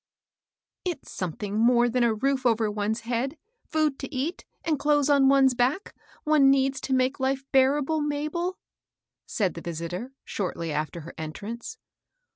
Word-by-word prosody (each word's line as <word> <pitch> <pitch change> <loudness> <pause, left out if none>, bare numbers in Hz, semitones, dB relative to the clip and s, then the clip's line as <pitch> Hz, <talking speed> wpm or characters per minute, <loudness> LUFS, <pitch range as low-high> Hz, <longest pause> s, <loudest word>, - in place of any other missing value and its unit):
I 355 - +1
T'S 295 - -14
swiething 195 +4 -3
more 240 +1 +5
thw 245 +1 +1
a 235 - +4
roof 265 +3 0
over 225 -3 +2
one's 210 +2 -1
head) 245 +6 -2 0.3
food 310 -3 0
to 270 - -6
eat, 295 +6 -3 0.2
axid 310 -4 +1
clothes 290 -1 +3
on 275 -2 +5
one's 270 -1 +5
back, 255 +11 0 0.3
one 300 -3 +5
needs 270 0 +2
to 265 - 0
make 260 +2 +1
life 265 0 0
bearable, 285 +3 +3
Mabel," 305 +5 -2 0.7
said 195 -5 0
the 170 - -8
visitor, 170 +9 -5
shortly 170 -4 -3
after 155 +3 -3
her 165 - -10
entrance. 215 - -6
260 Hz, 155 wpm, -26 LUFS, 215-290 Hz, 0.7 s, more